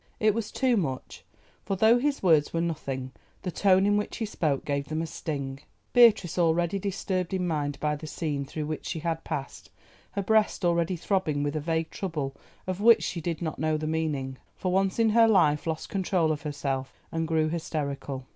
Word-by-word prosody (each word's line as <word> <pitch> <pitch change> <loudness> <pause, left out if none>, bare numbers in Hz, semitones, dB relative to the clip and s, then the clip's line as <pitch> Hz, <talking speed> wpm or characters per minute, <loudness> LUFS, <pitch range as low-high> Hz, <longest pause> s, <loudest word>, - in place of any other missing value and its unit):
It 215 -1 +4
was 215 -1 -3
too 255 -3 +2
much, 135 -9 -3 0.4
for 195 - -1
though 220 +5 +5
his 280 -1 -1
words 160 -5 +4
were 165 - -1
nothing 135 -6 -3 0.3
the 180 - -2
tone 190 +1 +4
in 205 0 +3
which 210 - -3
he 225 - -1
spoke 155 -9 -1
gave 140 -1 -1
them 155 +2 -2
a - - -2
sting. 140 -4 -4 0.3
Beatrice, 215 -8 +5
already 170 +3 +2
disturbed 190 -2 -2
in 185 -1 -1
mind 145 -4 -2
by 150 0 0
the 155 +1 -8
scene 150 -2 -2
through 150 +2 -5
which 155 0 -4
she 170 - -3
had 165 0 -2
passed, 135 - -5 0.4
her 200 - -1
breast 215 -2 +2
already 170 +1 +2
throbbing 165 -5 0
with 145 +1 -2
a - - 0
vague 160 +1 -1
trouble 150 -8 -3 0.3
of 185 +1 -3
which 230 +1 +6
she 170 - -3
did 170 +1 -3
not 160 - -3
know 155 0 +1
the 155 - -4
meaning, 150 -5 -2 0.2
for 185 - -2
once 190 0 +1
in 225 -1 +3
her 230 +1 +6
life 165 -8 +3
lost 160 -1 -3
control 185 -4 +1
of 150 -1 -2
herself 140 -3 -3
and 165 0 -1
grew 160 -1 +2
hysterical. 140 -5 -3
165 Hz, 200 wpm, -27 LUFS, 150-190 Hz, 0.4 s, which